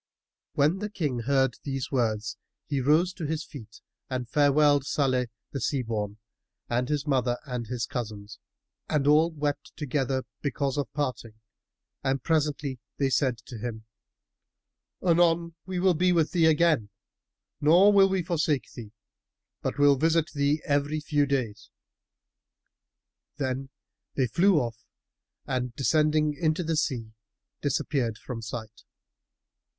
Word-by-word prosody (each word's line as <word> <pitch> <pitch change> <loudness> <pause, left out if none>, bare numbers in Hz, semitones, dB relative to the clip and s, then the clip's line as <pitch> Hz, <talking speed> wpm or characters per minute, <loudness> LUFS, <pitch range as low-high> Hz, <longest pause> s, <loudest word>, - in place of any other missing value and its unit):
When 155 +7 +2
the 210 +1 -3
King 150 - -2
heard 135 +1 +1
these 135 -2 -4
words 110 -3 0 0.3
he 140 -3 -1
rose 160 +7 +3
to 165 -5 -5
his 160 +1 -2
feet 115 -6 -12 0.3
and 125 -2 -3
farewelled 145 +1 +4
Salih 130 -3 +1 0.2
the 135 - -4
Sea 135 -3 0
born 105 -3 -3 0.5
and 125 +1 -1
his 150 -1 -1
mother 130 -4 +1
and 125 -4 -4
his 120 0 -2
cousins, 110 -3 -6 0.5
and 150 -3 +1
all 155 +3 +5
wept 145 -3 -3
together, 135 -2 -1 0.2
because 140 -1 -1
of 140 - -3
parting 130 -6 -3 0.7
and 135 -1 0
presently 150 -4 0 0.2
they 135 -2 +1
said 130 -1 +2
to 120 - -8
him, 110 -1 -5 1.2
"Anon 170 -1 +3
we 185 -1 -3
will 185 0 +4
be 180 +3 +2
with 165 -3 +2
thee 165 -3 +4
again, 155 -8 +3 0.7
nor 175 +7 +6
will 195 -1 +6
we 190 -2 0
forsake 160 -5 0
thee, 110 -3 -9 0.7
but - - -3
will 145 -1 +5
visit 160 +2 +2
thee 145 +1 +1
every 145 +2 +1
few 145 -1 +1
days." 130 -7 -2 1.7
Then 135 -1 -2 0.5
they 130 - +2
flew 180 - +3
off 115 -3 -4 0.6
and 125 -2 -2
descending 150 +1 +2
into 160 +2 0
the 165 0 -1
sea, 120 -8 -2 0.5
disappeared 130 -4 -1
from 120 -1 -7
sight. 110 -1 -7
140 Hz, 135 wpm, -27 LUFS, 125-155 Hz, 1.7 s, nor